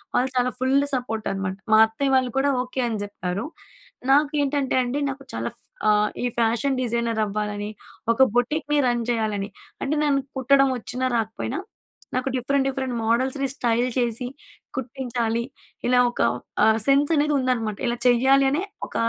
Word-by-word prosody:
వాళ్ళు 255 +2 +2
చాలా 250 0 +2
full 260 +1 +2 0.2
support 225 -4 -3
అనమాట. 195 -1 -3 0.2
మా - - +8
అత్తయ్య 270 +5 -1
వాళ్ళు 255 -1 +2
కూడా 275 +1 +3
ఓకే 255 +1 -3
అని 225 -3 -2
జెప్పారు. 200 0 -4 0.7
నాకు 290 +1 +4
ఏంటంటే 280 -1 0
అండి 250 +4 -2
నాకు 275 0 -6
చాలా 115 +1 -2 0.4
ఫా 215 - +6 0.3
ఈ - - +1
ఫ్యాషన్ 235 +4 +1
డిజైనర్ 235 -2 0
అవ్వాలని 210 0 -3 0.4
ఒక 230 +3 +5
బొటిక్‌ని 295 +4 +1
రన్ 240 -1 +1
చేయాలని. 215 -4 -1 0.3
అంటే 285 +3 0
నన్ను 280 -2 +2 0.2
కుట్టడం 275 +1 +4
వచ్చినా 250 +2 -4
రాకపోయినా, 225 - -3 0.6
నాకు 255 +1 0
డిఫరెంట్ 270 +2 +1
డిఫరెంట్ 265 -2 -3
మోడల్స్‌ని 260 +4 +1
స్టైల్ 240 0 +1
చేసి 240 0 -1 0.5
కుట్టించాలి 240 -3 -2 0.5
ఇలా 250 0 +4
ఒక - - -4 0.4
ఆ - - +5 0.2
సెన్స్ 280 +3 +4
అనేది 295 0 +2
ఉందన్నమాట. 230 -5 -1
ఇలా 240 0 -1
చేయ్యాలనే 270 +5 +4 0.2
ఒక - - -16
250 Hz, 150 wpm, -24 LUFS, 225-270 Hz, 0.7 s, మా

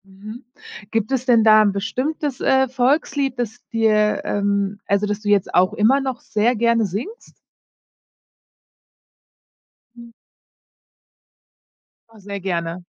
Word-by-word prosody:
Mhm. 210 +6 -11 0.5
Gibt 225 +1 -1
es 260 -1 -1
denn 235 -3 +4
da 215 0 +6
'n 205 - +2
bestimmtes, 260 +8 -3
äh, 265 0 +2
Volkslied, 270 0 0
das 225 -3 -4
dir, 215 -2 +1
ähm 200 0 -1
also, 200 +1 0
das 205 0 -3
du 210 - -3
jetzt 205 -2 +1
auch 185 +1 +3
immer 255 +7 +2
noch 265 -2 -4
sehr 220 +3 0
gerne 235 0 +2
singst? 230 - -7 2.6
Mhm. 235 -1 -13 2.0
Ja, 225 -1 -18
sehr 200 0 -7
gerne. 175 -2 -4
220 Hz, 120 wpm, -20 LUFS, 200-250 Hz, 2.6 s, da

